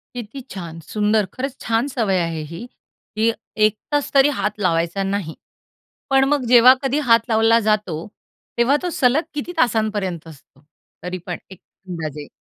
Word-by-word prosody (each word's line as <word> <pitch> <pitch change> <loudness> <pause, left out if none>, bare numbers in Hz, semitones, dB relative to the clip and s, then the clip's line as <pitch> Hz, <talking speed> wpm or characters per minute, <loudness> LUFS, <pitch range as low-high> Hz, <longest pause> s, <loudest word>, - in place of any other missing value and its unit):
किती 245 +3 -7
छान! 170 -4 -7
सुंदर, 210 +5 0
खरंच 270 +1 -5
छान. 230 +3 0
सवय 220 -8 0
आहे 165 -2 -3
ही, 170 +8 -7 0.5
की 225 +1 +2 0.3
1 215 0 +1
तास 290 -1 0
तरी 275 +1 +6
हात 210 +1 -2
लावायचा 170 +1 0
नाही. 195 -4 -3 0.7
पण 270 0 +4
मग 285 -4 +1
जेव्हा 250 +1 +8
कधी 270 +3 +1
हात 230 - +7
लावला 225 +1 +4
जातो, 195 -6 -1 0.5
तेव्हा 250 +5 +3
तो 355 - -1
सलग 265 +5 +3
किती 295 +4 -4
तासांपर्यंत 210 - 0
असतो? 140 -2 -16 0.4
तरी 180 +1 -4
पण 175 -2 -4
एक 190 - -12 0.3
अंदाजे? 155 -4 -5
215 Hz, 155 wpm, -21 LUFS, 175-250 Hz, 0.7 s, जेव्हा